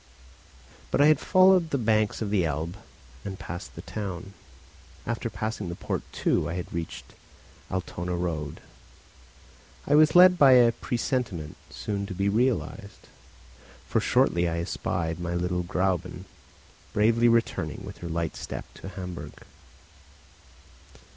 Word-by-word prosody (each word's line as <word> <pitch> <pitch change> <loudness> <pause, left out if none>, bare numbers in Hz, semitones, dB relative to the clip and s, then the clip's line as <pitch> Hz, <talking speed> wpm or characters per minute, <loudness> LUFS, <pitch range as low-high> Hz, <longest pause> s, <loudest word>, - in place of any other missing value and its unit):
But - - 0
I 145 - +7
had 155 -2 +5
followed 185 -2 +5
the 140 - 0
banks 110 -1 +1
of 100 - -3
the 100 -4 +3
Elbe 80 +3 -2 0.5
and 95 -2 -5
passed 85 -3 -7
the - - -8
town. 100 -2 -6 0.7
After - - -2
passing 110 -4 -4
the 85 - -4
port - - -3
too, - - 0
I 85 - -3
had 90 - -5
reached 85 -1 -5
the - - -13
Altona 90 -1 -3
road. 80 -4 -3 1.2
I - - +1
was 155 +2 +6
led 180 0 +8
by 135 -2 +8
a 120 -2 +7
presentiment, 115 - -3
soon 100 -1 -4
to 95 - -6
be 100 +2 +1
realised; 110 -2 -1 0.8
for - - +1
shortly 85 0 +2
I 85 - -2
espied 85 -1 -2
my 85 0 -3
little 90 0 -1
Gräuben 90 0 -1 0.7
bravely 115 +3 +4
returning 115 0 0
with - - -9
her 85 - -6
light 85 -1 -2
step - - -6 0.2
to - - -7
Hamburg. 90 -2 -8
95 Hz, 140 wpm, -27 LUFS, 85-115 Hz, 1.2 s, led